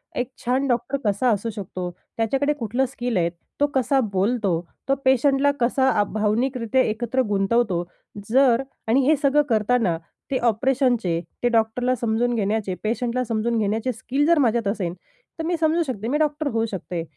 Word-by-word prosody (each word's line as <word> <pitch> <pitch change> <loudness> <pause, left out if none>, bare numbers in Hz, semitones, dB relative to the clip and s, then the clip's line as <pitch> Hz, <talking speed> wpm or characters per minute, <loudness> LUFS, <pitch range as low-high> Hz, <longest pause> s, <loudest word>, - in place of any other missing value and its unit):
एक 250 +1 -2
छान 260 +3 +1
डॉक्टर 245 +2 0
कसा 205 +5 +2
असू 210 +2 -1
शकतो. 185 -4 -5 0.3
त्याच्याकडे 270 +6 +1
कुठलं 245 0 -1
स्किल 245 -4 -3
आहे. 170 -1 +2 0.3
तो 290 - +4
कसा 270 +1 +2
बोलतो, 195 -3 +1 0.3
तो 275 - +4
पेशंटला 270 +2 +4
कसा 260 +2 +2
आ, 205 -4 +3
भावनिकरित्या 230 +4 0
एकत्र 240 +3 0
गुंतवतो? 195 -2 +1 0.5
जर 260 0 +4 0.2
आणि 255 +4 +3
हे 310 - +5
सगळं 290 0 +4
करताना 215 -5 +2 0.3
ते 265 - +2
ऑपरेशनचे 240 - +1 0.2
ते 245 - +4
डॉक्टरला 240 +2 +1
समजून 235 +1 0
घेण्याचे, 205 -2 -1
पेशंटला 240 +3 -1
समजून 230 0 -1
घेण्याचे 220 +4 0
स्किल 270 +6 -1
जर 340 0 +5
माझ्यात 235 -5 +2
असेन, 195 -5 -2 0.5
तर - - -2
मी 345 - 0
समजू 325 +1 +2
शकते 230 -7 -4
मी 285 - +1
डॉक्टर 300 0 0
होऊ 225 0 0
शकते. 180 -5 -5
240 Hz, 160 wpm, -23 LUFS, 215-265 Hz, 0.5 s, हे